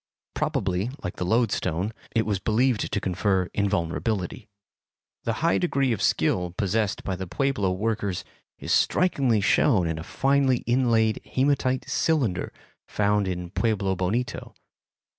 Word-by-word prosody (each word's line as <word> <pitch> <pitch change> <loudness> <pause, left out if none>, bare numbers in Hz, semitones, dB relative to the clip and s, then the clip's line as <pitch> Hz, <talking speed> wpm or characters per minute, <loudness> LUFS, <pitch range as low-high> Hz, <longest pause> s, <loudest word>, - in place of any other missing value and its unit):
Probably, 95 +3 -1
like - - -5
the 90 - -2
loadstone, 105 -3 0 0.2
it 115 - +2
was 105 -3 -1
believed 115 +4 +1
to 105 - 0
confer 95 0 0
invulnerability. 100 +2 -1 0.8
The 115 - +1
high 170 - +3
degree 140 -7 +1
of 110 - -4
skill 90 -1 +1
possessed 105 +1 0
by 95 - -2
the 95 0 -6
Pueblo 100 +1 0
workers 100 -1 -2 0.3
is - - -2
strikingly 135 - +2
shown 100 - +3
in 80 -1 -2
a - - -6
finely 135 +4 +1
inlaid 115 -3 +2
hematite 130 -1 0
cylinder 135 - 0 0.4
found 105 -1 +1
in 90 -1 -4
Pueblo 100 -3 0
Bonito. 110 +6 -2
105 Hz, 130 wpm, -25 LUFS, 95-125 Hz, 0.8 s, high